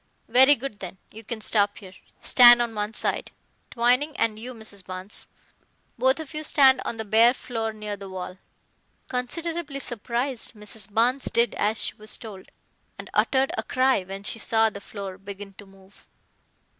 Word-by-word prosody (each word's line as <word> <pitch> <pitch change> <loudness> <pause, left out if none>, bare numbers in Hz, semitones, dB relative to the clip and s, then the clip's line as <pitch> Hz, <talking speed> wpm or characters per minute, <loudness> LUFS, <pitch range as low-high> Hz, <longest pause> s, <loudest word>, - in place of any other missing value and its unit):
"Very 265 +5 +7
good 235 -5 -7
then, 185 0 -8
you 220 +1 -11
can 220 +1 -6
stop 205 -1 +1
here. 190 -3 -12 0.3
Stand 240 -1 +8
on 235 -1 -1
one 210 +1 -3
side, - - -1 0.4
Twining, 250 +6 +2
and 215 -1 0
you, 250 +2 -7
Mrs. 215 -3 -7
Barnes. 185 +2 -6 0.7
Both 260 +4 +2
of 315 -1 -8
you 305 0 -4
stand 265 -3 +5
on 230 - -4
the 220 - -4
bare 225 +4 +5
floor 225 -3 -4
near 210 -1 -6
the 195 -1 -10
wall." 185 0 -7 0.7
Considerably 290 +4 -3
surprised, 240 +1 -3
Mrs. 210 -1 -3
Barnes 245 +5 +2
did 235 +1 +2
as 215 +2 0
she - - 0
was 215 0 -1
told, 205 -5 -11 0.5
and - - -10
uttered 265 0 +2
a - - -1
cry 260 -4 +2
when 195 +2 -8
she 225 - -2
saw 225 0 +2
the 200 - -9
floor 195 -2 -8
begin 200 0 -9
to 200 +1 -14
move. 195 0 -21
225 Hz, 170 wpm, -25 LUFS, 200-250 Hz, 0.7 s, Stand